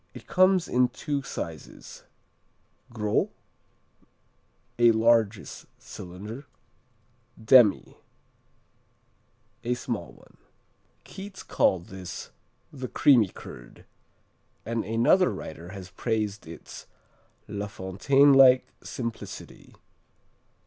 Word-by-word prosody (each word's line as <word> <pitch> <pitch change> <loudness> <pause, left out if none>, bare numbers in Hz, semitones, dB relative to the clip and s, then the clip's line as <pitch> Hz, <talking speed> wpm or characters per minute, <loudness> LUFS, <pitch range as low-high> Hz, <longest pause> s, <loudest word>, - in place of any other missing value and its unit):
It - - -11
comes 185 -1 +3
in 125 0 +3
two 140 +3 -4
sizes: 85 - -8 0.9
Gros 105 -3 0 1.5
a 120 -1 +7
largest 110 -2 +1
cylinder 105 +10 -9 0.9
Demi 110 -1 +4 1.7
a 125 +1 0
small 115 - -5
one - - -21 0.7
Keats 195 0 -10
called 90 -2 +1
this 95 -2 -8 0.4
"the 130 -3 -6
creamy 120 -4 +4
curd," - - -12 0.8
and 115 +1 -2
another 115 - +3
writer 85 +2 -8
has 95 -1 -9
praised 105 -1 -3
its 80 -1 -11 0.6
"La 100 0 -4
Fontaine 110 +10 +3
like 130 -1 +7 0.2
simplicity." 115 -2 -7
115 Hz, 85 wpm, -26 LUFS, 95-130 Hz, 1.7 s, a